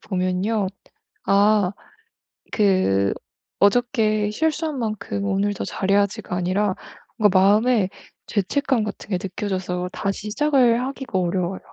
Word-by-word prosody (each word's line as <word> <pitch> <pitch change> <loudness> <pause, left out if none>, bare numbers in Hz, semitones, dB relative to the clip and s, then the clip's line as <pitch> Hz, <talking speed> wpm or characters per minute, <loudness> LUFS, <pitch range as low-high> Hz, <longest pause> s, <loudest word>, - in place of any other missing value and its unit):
보면요. 190 +2 -1 0.6
아 200 -1 +3 0.8
그 185 - +2 0.5
'어저께 215 -1 +2
실수한 315 +2 -1
만큼 215 -3 -3
오늘 200 +1 0
더 - - -5
잘 195 - -3
해야지.'가 200 -1 +1
아니라 185 +2 0 0.4
뭔가 205 -4 +4
마음에 210 +2 +4 0.4
죄책감 240 +4 0
같은 210 0 -7
게 185 - +2
느껴져서 185 -2 -3
다시 195 +2 -3
시작을 255 -4 +3
하기가 265 -6 -4
어려워요. 180 +1 -1
205 Hz, 260 characters per minute, -22 LUFS, 190-225 Hz, 0.8 s, 뭔가